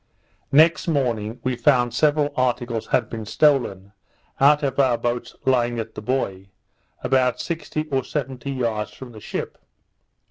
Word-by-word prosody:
Next 160 +5 +5
morning, 120 -7 -1
we 130 -1 0
found 120 -1 +3
several 150 -1 +2
articles 120 -3 -1
had 120 -4 +1
been 110 -1 -6
stolen, 110 -6 +1 0.5
out 150 +2 +5
of 135 -1 -1
our 130 -3 +3
boats 120 +1 -3
lying 120 -2 +2
at 110 -1 -5
the - - -7
buoy, 100 -6 -2 0.5
about 130 -2 +2
sixty 160 -2 -4
or 135 -2 0
seventy 130 -1 -4
yards 110 -5 -2
from 130 -2 -10
the 110 -2 -12
ship. - - -5
125 Hz, 145 wpm, -23 LUFS, 115-140 Hz, 0.5 s, Next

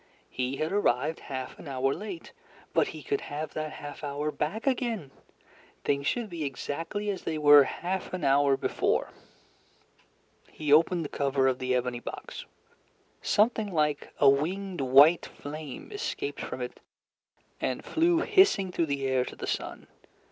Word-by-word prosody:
He 130 +1 -2
had 155 +2 -1
arrived 155 -6 +1
half 130 -2 -6
an - - -10
hour 135 0 0
late, 195 -3 -7 0.4
but - - +3
he - - -8
could 420 -2 -1
have 150 +1 -5
that 155 0 -4
half 145 +1 -9
hour 145 +1 -2
back 180 +10 -3
again! 235 - -1 0.7
Things 140 0 0
should 240 -3 0
be 170 -5 -5
exactly 165 +9 -3
as 190 - -5
they 160 - -3
were 145 -2 +8
half 185 +7 -3
an 180 -2 -4
hour 140 0 +4
before. - - 0 1.4
He 150 -2 0
opened 165 +2 +4
the - - -7
cover 135 -1 +2
of 130 -1 +1
the 130 0 0
ebony 125 -1 -1
box. - - -7 0.8
Something 215 -1 +2
like 150 -3 0
a 140 - +5
winged 175 +6 +1
white 140 +6 +6
flame 150 - -8
escaped 415 -1 -4
from - - -5
it, - - -6 0.8
and - - -2
flew 335 +1 +2
hissing 380 - +4
through 170 -2 0
the 140 -1 -2
air 130 -1 +2
to - - -8
the - - -6
sun. - - -4
155 Hz, 155 wpm, -28 LUFS, 140-195 Hz, 1.4 s, were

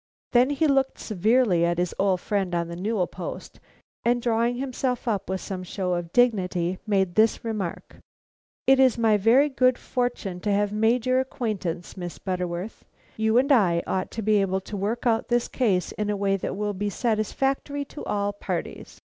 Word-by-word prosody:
Then 250 +2 +4
he 290 +2 +1
looked 270 -2 +2
severely 215 -2 +2
at 170 0 +1
his 175 0 -1
old 190 -2 +2
friend 195 -4 -1
on 170 0 -1
the 170 - -6
newel 195 +1 0
post, - - -8 0.4
and 240 +1 +2
drawing 235 0 +1
himself 255 -1 -2
up 200 -4 -1
with 190 0 -2
some 190 -2 -5
show 185 0 -3
of 175 -1 -3
dignity, 185 -7 +1
made 190 -4 +1
this 220 +3 +2
remark: 210 -6 -4 0.7
"It 270 0 +5
is 260 -3 +5
my 225 -2 +3
very 235 +8 +5
good 255 -3 +2
fortune 245 -7 -3
to 205 +3 -1
have 205 0 +1
made 225 +3 +2
your 255 0 +3
acquaintance, 205 -10 -3
Miss 175 -2 -6
Butterworth. 180 +1 -4 0.3
You 220 +1 +2
and 275 +3 +3
I 180 -10 +4
ought 190 - -2
to 225 - -2
be 210 0 +3
able 190 0 0
to 205 - -8
work 210 +5 -2
out 225 -2 +2
this 240 0 +1
case 200 -8 0
in 210 -1 -3
a 205 - 0
way 195 0 +1
that 195 0 -4
will 205 0 -1
be 205 +2 -2
satisfactory 270 +6 -1
to 290 - -9
all 205 0 -1
parties." 205 - -5
210 Hz, 185 wpm, -25 LUFS, 185-245 Hz, 0.7 s, It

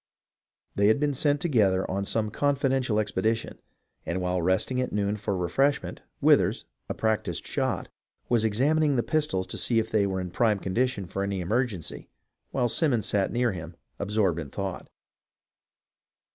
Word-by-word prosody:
They 100 0 +3
had 110 +5 +4
been 145 -1 +1
sent 145 +1 +1
together 105 - +2
on 100 +1 -2
some 110 +1 0
confidential 135 -5 +1
expedition, 110 +2 -1 0.4
and 85 - -2
while 90 0 -1
resting 95 +9 +1
at 125 - -2
noon 100 0 0
for 105 -2 -2
refreshment, 135 +12 0 0.2
Withers, - - +3 0.2
a - - -2
practised 110 -1 -1
shot, - - -2 0.4
was 120 -2 +2
examining 145 +7 +2
the 120 - +1
pistols 150 -12 0
to - - -5
see 115 - +2
if 110 0 0
they 105 -2 +2
were 95 -1 -2
in 90 -1 -5
prime 110 +2 +2
condition 100 +2 -1
for 95 +3 -4
any 100 -1 -2
emergency, 105 0 -2 0.4
while 125 -2 +1
Simons 120 -3 +1
sat 100 -2 +1
near 120 -1 +1
him, 85 -2 -7 0.2
absorbed 100 -4 +1
in 75 -4 -6
thought. 95 +3 -5
110 Hz, 160 wpm, -27 LUFS, 95-125 Hz, 0.4 s, had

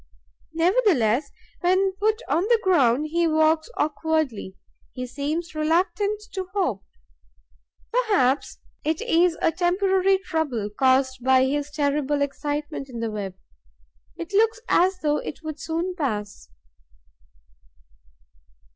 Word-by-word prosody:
Nevertheless, 325 - +2 0.3
when 375 +2 +2
put 435 +3 +1
on 330 - +1
the 465 +1 +3
ground, 295 -5 +3
he 340 0 +2
walks 315 +1 +2
awkwardly, 300 -10 -1 0.4
he 250 -1 -5
seems 300 +7 -4
reluctant 355 +7 0
to 380 -2 -4
hop. 265 - 0 1.1
Perhaps 410 - +1 0.3
it 315 +1 0
is 340 0 +2
a - - +4
temporary 380 +2 +2
trouble, 315 - -2
caused 260 +1 +2
by 260 0 +4
his 290 +2 -1
terrible 290 -1 0
excitement 290 0 -4
in 240 -2 -7
the 230 -1 -2
web. 200 -3 -5 0.8
It 340 +3 -7
looks 450 +2 +3
as 370 +1 +3
though 295 -1 +1
it 315 - -7
would 310 -1 -6
soon 335 +4 -2
pass. 210 - -4
315 Hz, 115 wpm, -24 LUFS, 270-365 Hz, 1.1 s, a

